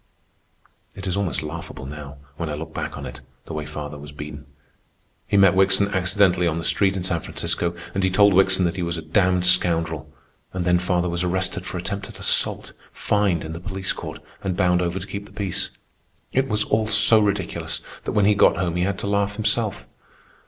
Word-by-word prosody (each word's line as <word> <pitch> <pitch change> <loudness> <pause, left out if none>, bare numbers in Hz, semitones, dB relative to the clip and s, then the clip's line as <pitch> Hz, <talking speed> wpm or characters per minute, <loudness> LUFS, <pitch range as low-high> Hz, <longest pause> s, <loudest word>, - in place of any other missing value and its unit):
It 95 - -8
is 95 - -1
almost 90 -8 -1
laughable 75 -3 -7
now, 75 0 -8 0.2
when 80 +1 -4
I 75 - -3
look 80 +2 -7
back - - -4
on - - -6
it, - - -9 0.2
the - - -8
way 75 -1 -4
father 75 0 -6
was 75 +1 -10
beaten. 75 0 -9 0.8
He 100 - +2
met 95 -2 +6
Wickson 95 +1 +4
accidentally 95 -2 +2
on 80 -1 -1
the 85 - -4
street 95 +4 +2
in 90 - -3
San 90 -2 0
Francisco, 85 +2 -2 0.2
and 95 - -1
he 95 - +3
told 100 +2 +5
Wickson 95 0 +4
that 85 +2 -1
he - - -2
was 85 -1 -2
a 80 - -6
damned 90 +2 +2
scoundrel. 80 -4 +2 0.4
And 90 -1 -2
then 90 0 +3
father 90 0 0
was 85 +1 -1
arrested 95 +1 -2
for - - -4
attempted 100 +3 -5
assault, - - +1 0.2
fined 100 -6 0
in 80 0 -6
the 85 - -6
police 95 +1 -3
court, - - -7 0.2
and 95 -2 -2
bound 90 0 +3
over 90 +1 -1
to 95 - -5
keep 100 0 -7
the - - -18
peace. 95 -4 -3 0.6
It 135 +1 +2
was 105 -2 +2
all 110 0 0
so 110 +1 +7
ridiculous 100 -3 -1 0.2
that - - -2
when 105 - +3
he 105 - +5
got 100 - +4
home 90 -1 -1
he 90 - +1
had 100 0 -1
to - - -4
laugh 100 0 0
himself. 110 0 0
90 Hz, 210 wpm, -23 LUFS, 85-100 Hz, 0.8 s, so